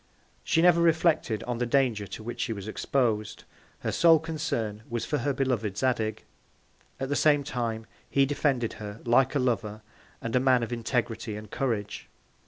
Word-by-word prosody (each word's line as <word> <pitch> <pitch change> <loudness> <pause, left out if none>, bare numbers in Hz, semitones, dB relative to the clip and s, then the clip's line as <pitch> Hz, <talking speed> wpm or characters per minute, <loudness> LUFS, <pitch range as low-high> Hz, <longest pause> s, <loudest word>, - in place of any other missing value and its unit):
She 165 - +2
never 175 -1 +6
reflected 160 -8 +2
on 120 -1 -3
the 120 - +1
Danger 120 -6 +1
to 110 - -8
which 120 +2 -5
she 115 - -1
was 100 -1 -7
expos'd; 110 -2 -1 0.4
her - - -1
sole 165 -1 +6
Concern 120 -9 -3
was 120 -1 -2
for 150 - -1
her 140 +4 0
beloved 125 -7 -1
Zadig. 115 -4 0 0.8
At 135 0 -3
the 145 - 0
same 145 -2 +4
Time, 115 -4 -3 0.2
he 140 0 +3
defended 135 -4 0
her, 105 +1 -7
like 130 +5 +3
a - - +4
Lover, 110 -4 -1 0.4
and 115 +2 -3
a - - +5
Man 130 -2 +3
of 115 - -3
Integrity 115 -2 -2
and 105 -1 -9
Courage. 110 -6 -3
120 Hz, 175 wpm, -27 LUFS, 110-140 Hz, 0.8 s, never